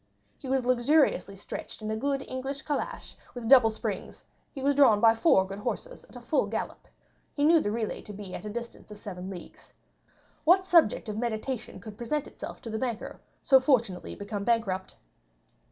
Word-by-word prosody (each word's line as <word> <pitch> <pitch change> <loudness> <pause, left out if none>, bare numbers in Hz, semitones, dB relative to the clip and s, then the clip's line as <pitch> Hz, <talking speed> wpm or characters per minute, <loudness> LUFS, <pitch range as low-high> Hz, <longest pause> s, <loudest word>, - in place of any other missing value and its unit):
He 270 - -9
was 265 -2 +1
luxuriously 250 - +2
stretched 195 - -7
in 215 0 -4
a - - -1
good 275 +4 -1
English 270 +2 -4
calash, 395 +11 -4 0.2
with 240 -2 -5
double 250 -3 +7
springs; 220 - -5 0.3
he 270 - -7
was 285 +1 +3
drawn 260 -7 +6
by 225 +1 +6
four 225 - +4
good 195 +1 -7
horses, - - -5
at - - -10
full - - +1
gallop; - - -5 0.5
he 285 - 0
knew 325 +2 +6
the 205 - -1
relay 220 0 -3
to - - -10
be 200 -2 -8
at - - -6
a 210 - -5
distance 235 +1 -7
of 210 - -9
seven 185 -3 -7
leagues. 180 -3 -11 0.7
What 370 +4 +5
subject 335 - +4
of 215 0 -3
meditation 235 +1 -3
could 215 -2 -11
present 285 +5 -1
itself - - -9
to 230 - -6
the 220 - -2
banker, 240 -4 -4 0.2
so 265 -1 +6
fortunately 235 -9 +1
become 200 0 -5
bankrupt? 200 -5 0
235 Hz, 185 wpm, -28 LUFS, 210-275 Hz, 0.7 s, double